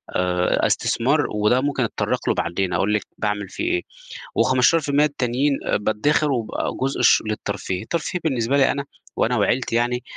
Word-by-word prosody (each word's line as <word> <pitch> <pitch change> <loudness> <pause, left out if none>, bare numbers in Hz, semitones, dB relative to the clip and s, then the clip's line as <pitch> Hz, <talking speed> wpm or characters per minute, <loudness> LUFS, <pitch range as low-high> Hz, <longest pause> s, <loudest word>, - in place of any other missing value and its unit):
آآ، 90 0 +1
أ - - +4
استثمار - - +1
وده 105 +4 +2
ممكن 140 -2 0
أتطرق 115 - -2
له - - +2
بعدين، 90 +1 -1
أقُول 105 +2 +1
لِك 105 - +1 0.2
باعمِل 105 -1 -2
فيه - - -5
إيه، 360 - +1 0.5
و15% 145 +3 +3
التانيين 135 0 0 0.2
بادخر 145 +8 +1
وبقى 115 -5 -2
جزء 135 +1 -1
الش - - +5
للترفيه، 105 -3 -3
الترفيه 170 +7 -3
بالنسبة 130 -3 +1
لي 135 - +4
أنا 140 0 -3 0.3
وأنا - - +1
وعيلتي 120 -2 0
يعني 120 +1 0
125 Hz, 160 wpm, -22 LUFS, 105-140 Hz, 0.5 s, الش